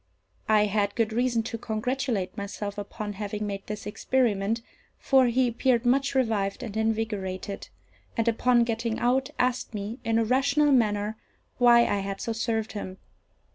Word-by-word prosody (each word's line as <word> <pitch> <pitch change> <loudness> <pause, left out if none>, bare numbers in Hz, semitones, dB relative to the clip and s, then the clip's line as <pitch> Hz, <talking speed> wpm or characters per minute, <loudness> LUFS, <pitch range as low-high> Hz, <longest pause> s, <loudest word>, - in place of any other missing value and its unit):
I 210 -1 +5
had 205 0 0
good 225 -2 0
reason 240 -1 +1
to 230 +1 -5
congratulate 225 -2 -2
myself 200 0 -5
upon 205 +1 -5
having 210 +1 -4
made 200 -1 -5
this 210 -1 -5
experiment; 225 -1 0 0.3
for 265 -2 +4
he 250 +2 +2
appeared 240 +1 +1
much 270 +3 +2
revived 215 -6 0
and 220 -4 -6
invigorated, 215 -3 -2 0.5
and, 230 0 +1
upon 240 +1 +3
getting 230 -1 -2
out, 260 +3 +1
asked 250 -2 0
me, 210 +5 -5
in 225 -1 +1
a 230 - +2
rational 280 +5 +3
manner, 215 -4 +2 0.4
why 240 -1 +7
I 205 -3 +1
had 195 0 -4
so 230 - -2
served 225 -1 -1
him. 190 -3 -6
225 Hz, 155 wpm, -27 LUFS, 205-245 Hz, 0.5 s, why